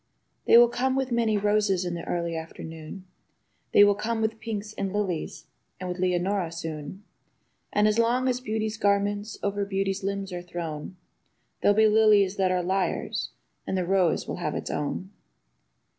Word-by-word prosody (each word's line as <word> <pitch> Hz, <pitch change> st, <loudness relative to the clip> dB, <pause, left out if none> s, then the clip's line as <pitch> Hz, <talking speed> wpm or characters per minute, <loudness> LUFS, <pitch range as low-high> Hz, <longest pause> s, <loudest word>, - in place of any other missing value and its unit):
They -, -, +7 dB
will 240 Hz, 0 st, +8 dB
come 260 Hz, +2 st, 0 dB
with 265 Hz, -1 st, -1 dB
many 230 Hz, -3 st, +2 dB
roses 205 Hz, -3 st, +1 dB
in 175 Hz, -, -2 dB
the 170 Hz, -, -5 dB
early 170 Hz, -1 st, -2 dB
afternoon. 160 Hz, +2 st, -8 dB, 0.7 s
They 205 Hz, -, +7 dB
will 205 Hz, 0 st, +6 dB
come 225 Hz, +3 st, -2 dB
with 220 Hz, 0 st, -1 dB
pinks 215 Hz, -2 st, -5 dB
and 195 Hz, -2 st, -3 dB
lilies 190 Hz, -5 st, -3 dB, 0.3 s
and 185 Hz, 0 st, -5 dB
with 180 Hz, 0 st, -4 dB
Leonora 180 Hz, 0 st, 0 dB
soon; 160 Hz, +3 st, -6 dB, 0.7 s
And 210 Hz, 0 st, +3 dB
as 215 Hz, +2 st, +2 dB
long 245 Hz, +3 st, +2 dB
as 250 Hz, -1 st, +1 dB
beauty's 220 Hz, -2 st, -2 dB
garments 205 Hz, +1 st, 0 dB
over 200 Hz, 0 st, 0 dB
beaut/s 195 Hz, 0 st, -1 dB
limbs 195 Hz, -1 st, -3 dB
are 175 Hz, -, -4 dB
thrown, 170 Hz, -1 st, -6 dB, 0.7 s
There'll 205 Hz, 0 st, +4 dB
be 220 Hz, 0 st, +6 dB
lilies 210 Hz, -2 st, +4 dB
that 190 Hz, -1 st, +2 dB
are 180 Hz, -1 st, +1 dB
liars, 190 Hz, +1 st, -1 dB, 0.4 s
and 190 Hz, -, -1 dB
the 180 Hz, -, 0 dB
rose 185 Hz, -2 st, +2 dB
will -, -, -4 dB
have -, -, -3 dB
its -, -, -4 dB
own. 185 Hz, +6 st, -3 dB
200 Hz, 170 wpm, -26 LUFS, 180-215 Hz, 0.7 s, will